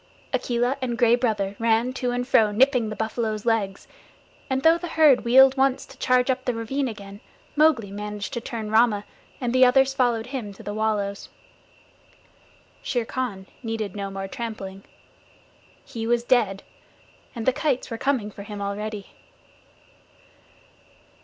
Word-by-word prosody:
Akela 245 +2 0
and 240 -2 -2
Gray 235 -1 +4
Brother 215 -5 -1
ran 230 +2 +2
to 255 -1 -2
and 245 0 -2
fro 220 -4 +4
nipping 250 0 +3
the 215 - -5
buffaloes' 220 -1 -3
legs, 210 -4 -1 0.6
and 265 0 -1
though 330 +1 +5
the 350 - -5
herd 310 -5 +4
wheeled 265 +2 +6
once 270 -1 +2
to - - -15
charge 255 +1 +3
up 255 0 -3
the 245 - 0
ravine 265 +5 -2
again, 200 -3 -8 0.4
Mowgli 295 -10 +3
managed 210 +2 -5
to 235 - -3
turn 220 -2 -5
Rama, 220 -2 +3 0.3
and 245 -2 -2
the 255 0 +5
others 265 +1 +5
followed 240 -4 +1
him 220 -7 -4
to - - -13
the 205 - -5
wallows. 210 -2 -2 1.5
Shere 245 -3 -1
Khan 220 -7 -4 0.2
needed 225 -5 -4
no 200 -1 -4
more 195 0 -5
trampling. 195 -3 -6 1.0
He 225 -1 -5
was 235 0 +2
dead, 220 -6 +1 0.7
and 230 -2 -4
the 260 - +3
kites 265 -3 -1
were 230 - -4
coming 255 -7 0
for 200 - -10
him 205 0 -7
already. 205 +1 -5
230 Hz, 155 wpm, -24 LUFS, 210-255 Hz, 1.5 s, wheeled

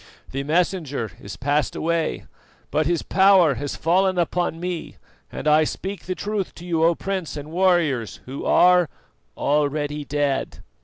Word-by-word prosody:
The 135 - -2
Messenger 155 - -1
is 100 - -8
passed 145 -1 0
away, 165 0 -1 0.5
but 155 -1 +1
his 170 -1 0
power 190 -5 +5
has 140 +2 -4
fallen 185 +3 +2
upon 175 -1 0
me 175 -1 -4 0.4
and - - -5
I 155 +1 +5
speak 190 +5 -5
the 185 - -2
truth 205 -1 -3
to 175 - -10
you, 165 -2 0
O 170 +1 +4
Prince 190 -5 -4
and 145 +1 -7
warriors, 165 - +1
who 135 +2 -6
are 180 -3 +5 0.5
already 145 0 0
dead." 145 -2 -2
165 Hz, 150 wpm, -23 LUFS, 145-180 Hz, 0.5 s, power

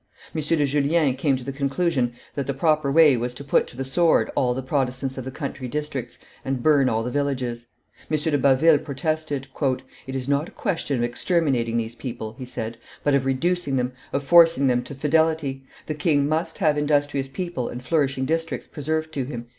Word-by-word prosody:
M. 155 - -1
de 150 0 +2
Julien 145 +1 +2
came 135 0 +1
to 130 - -8
the 140 - -4
conclusion 140 -2 0 0.2
that 140 -2 -3
the 140 - -2
proper 155 -1 +2
way 155 -2 +6
was 120 +1 -3
to 140 - -7
put 140 - +2
to 120 - -13
the 135 - -3
sword 165 +5 +3
all 125 -2 +2
the 130 - -3
Protestants 130 0 -1
of 130 - -6
the - - -4
country 135 -2 -5
districts 140 -3 -4 0.3
and 130 -2 -2
burn 145 -4 +4
all 110 0 0
the 125 - -3
villages. 125 -4 -2 0.4
M. 155 - +2
de 150 0 +1
Baville 140 +3 +5
protested. 150 -1 -3 0.6
"It 130 - -5
is 130 -1 -3
not 140 +3 +1
a - - -20
question 165 - -1
of 120 - 0
exterminating 120 -3 0
these 115 0 -2
people," 115 -3 -6
he 130 - -5
said, 115 -2 -5 0.2
"but 145 - +2
of 135 -1 +2
reducing 150 +3 0
them, 125 -1 0 0.2
of 140 - -1
forcing 165 -1 +6
them 125 -2 +3
to 140 - -8
fidelity; 150 -2 +1 0.2
the 155 - -3
king 145 -2 +2
must 155 +2 -1
have 155 -5 +2
industrious 145 -2 +1
people 135 -3 -4
and 125 +1 -7
flourishing 140 -1 +1
districts 165 +2 -2
preserved 155 +1 -3
to 135 -3 -2
him." 120 -3 -7
140 Hz, 200 wpm, -24 LUFS, 130-155 Hz, 0.6 s, way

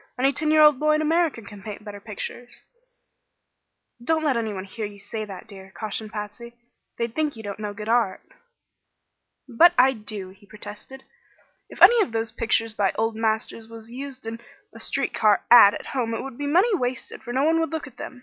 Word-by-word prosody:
"Any 270 +2 +2
ten 310 +2 0
year 310 0 +6
old 300 -3 +6
boy 305 0 +3
in 305 - 0
America 320 -6 +1
can 205 -1 -11
paint 210 0 -8
better 205 -1 -8
pictures." 225 +4 -8 1.4
"Don't 320 +4 +1
let 290 -4 +2
anyone 215 -5 -3
hear 215 +3 -7
you 205 0 -13
say 215 +2 -6
that, 195 -3 -9
dear," 190 -2 -12
cautioned 215 0 -4
Patsy. 220 +3 -7 0.4
"They'd 235 -1 -2
think 305 0 -1
you 220 - -10
don't 205 0 -6
know 210 -1 -4
good 210 0 -7
art." 225 -5 +1 1.2
"But 330 +9 +6
I 260 +1 +6
do," 210 -4 -4
he 200 +2 -19
protested. 210 +5 -10 0.7
"If - - 0
any 475 -1 +8
of 245 - -1
those 225 0 -1
pictures 225 -1 0
by 200 -3 +1
old 225 0 -1
masters 220 0 -2
was 225 0 -10
used 265 0 -7
in 230 +1 -6 0.3
a - - -12
street - - -2
car 210 -2 +3
'ad' 205 -4 +9
at - - -8
home 235 -4 -1
it - - -4
would 270 -2 -8
be 290 +3 -4
money 370 +10 +3
wasted, 250 -6 -4
for 240 - -7
no 260 +3 +1
one 325 +2 +3
would 325 - 0
look 320 -2 -3
at 255 -3 -14
them. 255 - -8
230 Hz, 205 wpm, -24 LUFS, 210-270 Hz, 1.4 s, ad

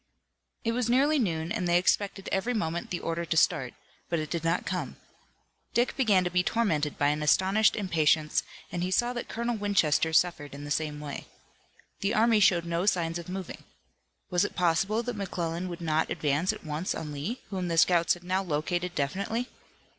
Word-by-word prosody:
It 230 - +1
was 240 0 -1
nearly 280 +5 +3
noon, 165 -6 -1
and 210 -5 -1
they 175 0 +4
expected 195 +2 0
every 230 +6 0
moment 170 -5 -2
the 175 - -3
order 165 +1 -2
to 165 -1 -1
start, 135 -4 +2 0.3
but 170 - 0
it 155 -1 -4
did 170 -2 -2
not 165 +2 0
come. - - -3 0.8
Dick 240 +1 +2
began 210 -8 +3
to 180 - -2
be 180 +1 +3
tormented 165 -9 0
by 145 - +3
an 150 +1 -1
astonished 190 +8 +3
impatience, 160 -6 +2 0.3
and 175 - -3
he 180 - -1
saw 240 +6 +1
that 240 - -5
Colonel 235 0 -2
Winchester 185 -6 +2
suffered 160 -4 +1
in 145 - -8
the 145 - -7
same 150 0 -1
way. 145 -1 -7 0.7
The 200 +4 0
army 225 0 +4
showed 175 -4 +4
no 170 +3 -1
signs 170 -3 +1
of 170 - -9
moving. 185 -1 -6 0.7
Was 180 +1 +3
it 205 - -3
possible 195 +6 +1
that 245 -1 -4
McClellan 175 -3 -3
would 175 -1 -7
not 160 -1 0
advance 150 +5 +1
at - - -10
once 155 +4 -2
on 155 -2 -5
Lee, 150 - -4
whom 185 -2 -2
the 165 -1 -1
scouts 170 0 +4
had 175 - -15
now 185 +2 0
located 175 +1 -2
definitely? 200 - -2
175 Hz, 190 wpm, -28 LUFS, 160-205 Hz, 0.8 s, they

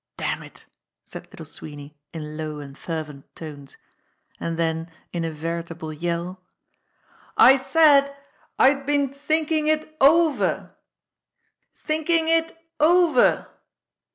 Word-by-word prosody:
"Damn - - -2
it - - -14 0.2
!" - - -64
said - - -10
Little - - -11
Sweeney 145 0 -10 0.2
in 155 -2 -7
low 155 -1 -5
and 140 -1 -10
fervent 150 -4 -7
tones; 145 -4 -10 0.6
and 165 -1 -3
then 165 0 -1 0.2
in 170 -1 -2
a 165 - -1
veritable 165 0 -5
yell: 170 +3 -4 1.0
"I 265 - +8
said 280 0 +4 0.5
I'd 275 +1 +3
been 285 -2 +1
thinking 310 +2 0
it 310 0 -1
over! 315 +2 +3 1.1
Thinking 320 +1 +1
it 330 0 +1 0.2
over! 345 +2 +4
180 Hz, 115 wpm, -23 LUFS, -, 1.1 s, I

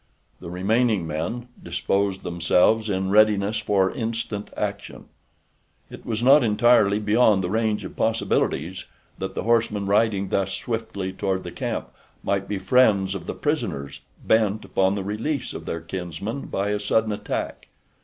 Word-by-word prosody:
The - - -8
remaining 105 +2 +1
men 85 +11 -4
disposed 95 +3 -1
themselves 90 +6 +2
in 95 -1 -1
readiness 105 0 +4
for 100 -3 +2
instant 115 -3 -4
action. - - -4 0.9
It - - -11
was 115 0 -2
not 135 +2 +7
entirely 105 -2 +4
beyond 105 -2 +3
the 90 - -2
range 110 -1 0
of - - -8
possibilities 95 -6 0 0.3
that - - -4
the - - -2
horsemen 110 -3 +1
riding 100 -1 +2
thus 95 0 0
swiftly 110 -5 -4
toward 95 -1 -2
the - - -7
camp - - -4 0.3
might 100 -1 -1
be 105 - -2
friends 95 -2 +3
of 95 - -7
the - - -4
prisoners 70 +1 -2 0.3
bent 110 -1 +2
upon 95 +1 +1
the 100 - -3
release 115 +8 -3
of - - -8
their 85 - -3
kinsmen 90 - -5
by 100 +1 -1
a 105 0 0
sudden 110 +1 +1
attack. 105 - -4
105 Hz, 150 wpm, -24 LUFS, 95-110 Hz, 0.9 s, not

